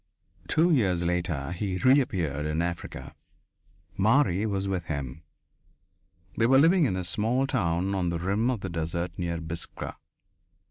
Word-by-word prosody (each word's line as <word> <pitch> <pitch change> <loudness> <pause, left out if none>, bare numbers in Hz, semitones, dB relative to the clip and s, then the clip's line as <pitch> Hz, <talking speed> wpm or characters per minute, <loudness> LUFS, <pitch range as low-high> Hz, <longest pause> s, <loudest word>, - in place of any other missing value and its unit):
Two 165 +3 +3
years 95 - +2
later 85 -4 -1
he 90 +1 -2
reappeared 95 - +2
in 80 +2 0
Africa. 85 -1 -5 0.8
Marie 105 -1 +3
was 100 -1 -1
with 95 -3 -2
him. 70 -2 -5 1.2
They 115 - +4
were 135 +2 +5
living 165 +4 +5
in 95 - 0
a 95 - -2
small 110 +10 +1
town 95 -6 0
on 90 -3 0
the 85 - -1
rim 100 +8 0
of 120 -6 -1
the 95 - -4
desert 85 +1 -3
near 85 -1 -2
Biskra. 85 +1 -6
90 Hz, 145 wpm, -27 LUFS, 85-115 Hz, 1.2 s, were